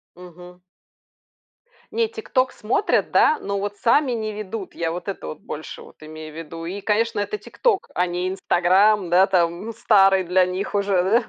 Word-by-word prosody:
Мгм. 180 0 -14 1.3
Не, 455 -1 +1
TikTok 330 - -1
смотрят, 225 - 0
да, 310 - +4
но 200 0 -3
вот 205 0 -4
сами 260 +5 +2
не 220 -2 -3
ведут. 210 -1 -7
Я 165 -1 -2
вот 175 +3 -6
это 195 - -5
вот 75 - -7
больше - - -8
вот - - -16
имею 155 0 -9
в 160 - -11
виду. 165 +1 -8
И, 195 +4 -5
конечно, 225 +1 0
это 205 - -2
TikTok, 435 -4 0 0.2
а 180 - +2
не 180 +1 -2
"Инстаграм", 190 +1 +2
да, 180 +2 +5
там, 175 0 0
ну, 230 - -5
старый 195 -3 +4
для 180 +1 +3
них 185 +3 -4
уже, 200 -2 +2
да. 225 +6 +2
195 Hz, 180 wpm, -22 LUFS, 180-215 Hz, 1.3 s, да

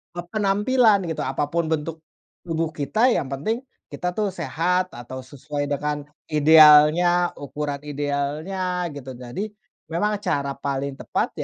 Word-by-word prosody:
eee, 175 0 -5
penampilan, 210 +2 +3
gitu. 160 - -3
Apapun 145 +5 -1
bentuk 160 +1 -2 0.4
tubuh 165 -1 -1
kita, 155 - +1
yang 140 - 0
penting 220 - -2 0.3
kita 180 0 -2
tuh 210 -1 +1
sehat, 180 +2 -1
atau 120 +2 -8
sesuai 145 +2 -5
dengan 145 +1 -2 0.2
idealnya, 155 +3 +6
ukuran 145 0 -4
idealnya, 150 +6 -2
gitu. 130 -2 -7
Jadi 125 +11 -5 0.5
memang 210 +4 0
cara 145 -8 -1
paling 140 0 -3
tepat - - -1
155 Hz, 125 wpm, -23 LUFS, 145-180 Hz, 0.5 s, idealnya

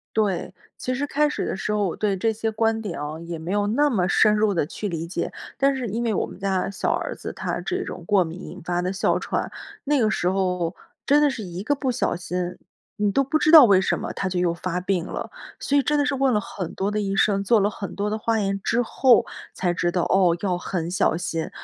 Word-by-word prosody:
对， 195 -5 0 0.2
其 255 - -2
实 275 +3 -1
开 300 +1 +2
始 295 - -3
的 - - -3
时 210 - -2
候 210 -1 +1
我 170 - -3
对 205 -2 0
这 225 +4 +1
些 220 +1 -2
观 225 0 0
点 205 -6 -5
啊， 150 +2 -5
也 170 0 -6
没 160 +3 -5
有 205 0 +1
那 290 +8 +2
么 190 -9 +1
深 210 +2 +4
入 210 -1 +2
地 165 - +1
去 205 +6 -5
理 165 -3 -3
解。 170 - -3 0.3
但 275 0 +3
是 255 -3 -3
因 225 +3 -2
为 230 -2 0
我 - - 0
们 - - -11
家 190 -1 0
小 195 - -1
儿 - - -2
子 - - -7
他 - - -3
这 - - -2
种 - - -7
过 200 -3 +4
敏 170 +2 -7
引 185 - -9
发 175 0 -1
的 180 +1 -2
哮 195 - +1
喘， - - -3 0.3
那 290 0 +2
个 220 -3 +3
时 180 -4 0
候 180 -3 0 0.3
真 290 +2 +4
的 295 - +5
是 255 -5 -5
一 180 -1 -6
个 290 +6 +1
不 270 -2 -1
小 240 -6 0
心， 180 0 -4 0.4
你 205 -1 +1
都 275 +7 +2
不 305 +4 +1
知 310 - +3
道 315 -5 +11
为 195 -4 +5
什 - - 0
么 - - -5
他 190 - -2
就 180 -1 -1
又 175 -1 +1
发 180 +1 -3
病 180 -2 -1
了。 - - -5 0.3
所 285 - +1
以 280 - +3
真 295 +1 +1
的 290 - +2
是 285 - 0
问 270 -1 +2
了 210 - +3
很 190 -4 -6
多 195 - -1
的 210 0 -1
医 195 -1 -2
生、 200 -1 +2
做 225 +2 +4
了 200 +1 +2
很 200 -3 -7
多 205 +1 -2
的 215 - -1
化 225 +1 0
验 195 -1 0
之 235 - +2
后 245 +1 +4 0.3
才 180 -2 0
知 175 0 0
道， 175 -1 0
哦， 185 -3 +3
要 185 -3 0
很 175 -2 -3
小 175 -2 +1
心。 165 -2 -3
200 Hz, 280 characters per minute, -24 LUFS, 180-230 Hz, 0.4 s, 道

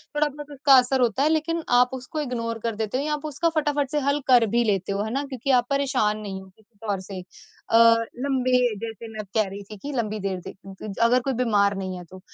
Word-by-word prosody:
थोड़ा 300 0 +3
बहुत 295 +1 -10
उसका 280 0 +3
असर 255 +1 +3
होता 245 +2 +2
है 305 - +3
लेकिन 320 +1 0
आप 250 0 +5
उसको 260 +4 -5
इग्नोर 230 -4 -3
कर 230 -2 -1
देते 220 +2 -2
हो 275 - -1
या 300 0 -1
आप 300 0 -4
उसका 310 +3 0
फटाफट 295 -3 0
से 300 - +1
हल 280 +1 +2
कर 245 -3 +6
भी 235 +3 +2
लेते 200 -3 0
हो, 200 +1 -1
है 220 - -4
ना? 275 +2 -1
क्योंकि 270 0 -3
आप 240 - -3
परेशान 270 -7 +1
नहीं 195 -2 -6
हो 190 - -14
किसी 220 0 -28
तौर 200 -2 0
से 190 0 -7 0.5
अ, - - +2 0.5
लँबे 255 -4 +2
जैसे 230 0 -7
मैं 215 -1 -5
कह 215 -3 +3
रही 200 +1 -8
थी 210 +1 -11
कि 285 +9 -6
लंबी 215 -2 -2
देर 190 -2 -3
ज - - -5
अ, 195 +2 -4
अगर 245 +2 +4
कोई 270 - 0
बीमार 205 -5 +2
नहीं 185 -1 -4
है 180 - -8
तो। 185 +3 -13
240 Hz, 250 wpm, -24 LUFS, 210-280 Hz, 0.5 s, कर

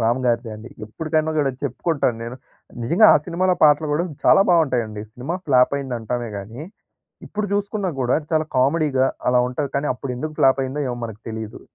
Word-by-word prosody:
రామ్ 120 +3 +2
గారిదే 115 -1 0
అండి. 110 +3 -11 0.2
ఎప్పటికైనా 155 +7 -1
కూడా 140 -2 +2
చెప్పుకుంటాను 140 -2 -1
నేను. 120 +2 -7 0.5
నిజంగా 170 - +5
ఆ - - +7
సినిమాలో 180 +1 +1
పాటలు 150 +1 +4
కూడా 160 +4 +1 0.2
చాలా - - +7
బాగుంటాయండి. 125 -11 +1
సినిమా 130 +9 -4
ఫ్లాప్ 130 -1 +4
అయిందంటామే 120 -3 -4
కానీ 110 +8 -8 0.6
ఇప్పుడు 210 0 -3
చూసుకున్నా 205 -1 -1
కూడా 125 0 +2 0.2
చాలా 155 -1 +2
కామెడీగా 135 0 +2 0.2
అలా 125 0 +4
ఉంటది. 140 +3 -3
కానీ 140 +1 -1
అప్పుడు 125 +1 -5
ఎందుకు 155 +4 -5
ఫ్లాప్ 135 0 +4
అయిందో 135 +3 -4
ఏమో! 120 - -3
మనకు 110 -2 -8
తెలీదు. 110 -1 -6
135 Hz, 170 wpm, -21 LUFS, 120-155 Hz, 0.6 s, ఆ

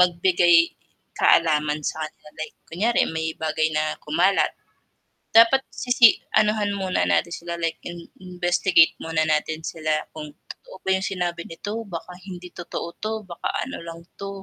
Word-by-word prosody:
magbigay 175 -1 +4 0.6
kaalaman 150 -2 +3
sa - - -10
kanila, 155 0 -12
like, 155 -1 -6
kunyari 215 +8 +1 0.2
may 160 0 -1
bagay 155 0 +1
na 155 - +2 0.2
kumalat. 180 +6 +2 0.9
Dapat 230 +4 +7 0.2
sisi 245 -1 +6 0.3
anuhan 210 -1 +1
muna 190 -1 0
natin 170 - +1
sila, 170 0 -6
like, 165 - -1
in 175 - -7 0.3
investigate 175 -1 +3
muna 160 -1 0
natin 155 +1 0
sila, 155 -1 -1 0.2
kung 150 -1 -7 0.2
totoo - - -15
ba - - -3
yung 190 - -2
sinabi 175 -2 -2
nito, 185 +5 -6 0.2
baka 170 +1 -6 0.2
hindi 180 -1 -8
totoo 170 -1 -5 0.2
'to, 215 +1 -1 0.2
baka 170 - -4 0.2
ano 265 - -6
lang 165 0 -7 0.2
'to. 200 - -5
175 Hz, 150 wpm, -23 LUFS, 160-190 Hz, 0.9 s, Dapat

